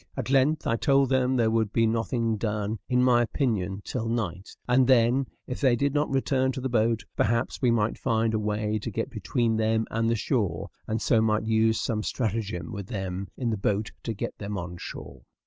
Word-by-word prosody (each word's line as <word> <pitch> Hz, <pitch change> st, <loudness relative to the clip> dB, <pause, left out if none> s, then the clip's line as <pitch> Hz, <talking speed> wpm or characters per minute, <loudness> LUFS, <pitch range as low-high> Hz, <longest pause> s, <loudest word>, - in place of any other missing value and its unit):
At -, -, -3 dB
length 140 Hz, +4 st, +3 dB
I 115 Hz, -, +1 dB
told 135 Hz, +1 st, +3 dB
them 130 Hz, -1 st, +2 dB
there 115 Hz, -3 st, +2 dB
would 110 Hz, -2 st, +1 dB
be 115 Hz, +1 st, +3 dB
nothing 115 Hz, 0 st, 0 dB
done, 105 Hz, 0 st, -2 dB
in 125 Hz, -1 st, +3 dB
my 125 Hz, -1 st, +5 dB
opinion, 105 Hz, -, -1 dB
till 115 Hz, -3 st, -3 dB
night; 100 Hz, -5 st, -3 dB, 0.2 s
and 125 Hz, +1 st, +4 dB
then, 130 Hz, +1 st, +4 dB, 0.2 s
if 125 Hz, -, -6 dB
they 130 Hz, -4 st, +4 dB
did 140 Hz, +3 st, 0 dB
not 150 Hz, 0 st, +1 dB
return 130 Hz, -1 st, +1 dB
to 135 Hz, -, -4 dB
the 130 Hz, +1 st, -2 dB
boat, 115 Hz, -1 st, +1 dB
perhaps 115 Hz, +2 st, 0 dB
we 125 Hz, -, +3 dB
might 115 Hz, -2 st, +1 dB
find 115 Hz, -2 st, +1 dB
a 110 Hz, -, +1 dB
way 105 Hz, 0 st, -1 dB
to 105 Hz, -, -5 dB
get 115 Hz, +5 st, -3 dB
between 110 Hz, +1 st, 0 dB
them 110 Hz, 0 st, +1 dB
and 115 Hz, 0 st, +1 dB
the 115 Hz, -, +2 dB
shore, 100 Hz, -, -1 dB, 0.2 s
and 110 Hz, 0 st, -2 dB
so 115 Hz, -3 st, +3 dB
might 110 Hz, -1 st, +1 dB
use 110 Hz, 0 st, +2 dB
some 110 Hz, -3 st, -1 dB
stratagem 110 Hz, -4 st, -2 dB
with 100 Hz, -4 st, -6 dB
them 95 Hz, -3 st, -4 dB
in 120 Hz, -3 st, -1 dB
the 110 Hz, -, -1 dB
boat 100 Hz, +2 st, -1 dB
to 115 Hz, -, -4 dB
get -, -, -4 dB
them 105 Hz, 0 st, -4 dB
on 90 Hz, -1 st, -6 dB
shore. -, -, -8 dB
115 Hz, 210 wpm, -27 LUFS, 105-125 Hz, 0.2 s, my